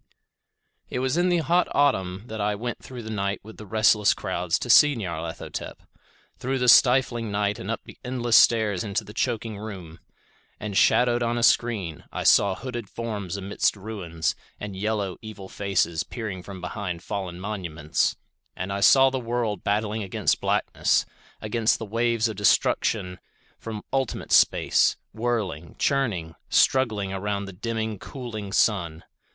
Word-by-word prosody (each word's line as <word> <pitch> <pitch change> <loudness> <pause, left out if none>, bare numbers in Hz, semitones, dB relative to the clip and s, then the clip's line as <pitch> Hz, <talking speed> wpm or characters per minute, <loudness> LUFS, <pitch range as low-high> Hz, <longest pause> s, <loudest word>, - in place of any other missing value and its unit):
It - - -4
was 130 +2 0
in 175 +1 +2
the 175 - +3
hot 175 +4 +3
autumn 95 -10 +1
that 110 -3 -5
I 105 0 0
went 120 +3 -4
through 125 -2 -9
the 110 - -6
night 100 -1 -2
with 110 +2 -12
the 105 - -10
restless 105 0 +4
crowds 90 -2 -1
to - - -5
see 145 +4 +7
Nyarlathotep; 85 -6 -5 0.6
through 135 +2 -1
the 125 -1 0
stifling 125 -2 +5
night 100 0 -1
and 95 - -6
up 115 - -2
the - - -14
endless 120 -2 0
stairs 105 -6 +4
into 105 -1 -2
the 105 - -11
choking 115 -3 -2
room. 95 -6 -8 0.6
And 105 -2 -5
shadowed 120 +4 +4
on 120 0 0
a 120 - -1
screen, 105 -10 +1
I - - -4
saw 100 -2 +5
hooded 120 -4 -6
forms 105 -5 -4
amidst 100 +2 0
ruins, 95 -6 -3 0.3
and 105 -2 -6
yellow 100 -1 -2
evil 110 -3 -9
faces 95 -5 0
peering 105 -6 -6
from 95 0 -9
behind 90 -2 -5
fallen 95 -4 -4
monuments. 85 -6 -1 0.4
And 95 +1 -4
I 100 - -2
saw 135 +6 +6
the 130 - -2
world 115 -4 -2
battling 105 +1 0
against 95 -2 0
blackness; - - +1 0.4
against 110 +1 +1
the 115 - -6
waves 115 +1 +1
of 110 - -5
destruction 90 -2 +1 0.4
from 110 -2 -6
ultimate 135 -2 -2
space; - - +4 0.2
whirling, 105 -9 -2
churning; 105 -13 0 0.2
struggling 110 -7 +2
around 100 +1 -2
the 95 - -9
dimming, 110 +1 -3
cooling 110 -7 -7
sun. 90 -7 +1
105 Hz, 155 wpm, -25 LUFS, 95-120 Hz, 0.6 s, see